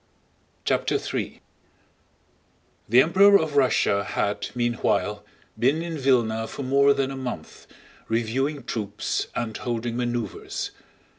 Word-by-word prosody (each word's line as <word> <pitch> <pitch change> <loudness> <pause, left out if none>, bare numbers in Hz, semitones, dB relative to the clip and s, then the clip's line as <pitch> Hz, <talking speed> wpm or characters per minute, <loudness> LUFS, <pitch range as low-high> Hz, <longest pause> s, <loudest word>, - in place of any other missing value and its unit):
CHAPTER - - +1
III - - -4 1.5
The 125 +4 +7
Emperor 200 +5 +6
of 160 -4 -3
Russia 125 -7 +3
had, 100 0 -2
meanwhile, 120 -3 0 0.4
been 145 +7 +2
in 170 -2 -4
Vílna 115 -5 +1
for 140 - -6
more 140 +2 +4
than 135 0 0
a - - -5
month, 125 -12 -7 0.4
reviewing 130 +5 -1
troops 105 -4 -3
and 110 -2 -3
holding 120 -1 -3
maneuvers. 120 -4 -3
125 Hz, 115 wpm, -25 LUFS, 115-140 Hz, 1.5 s, The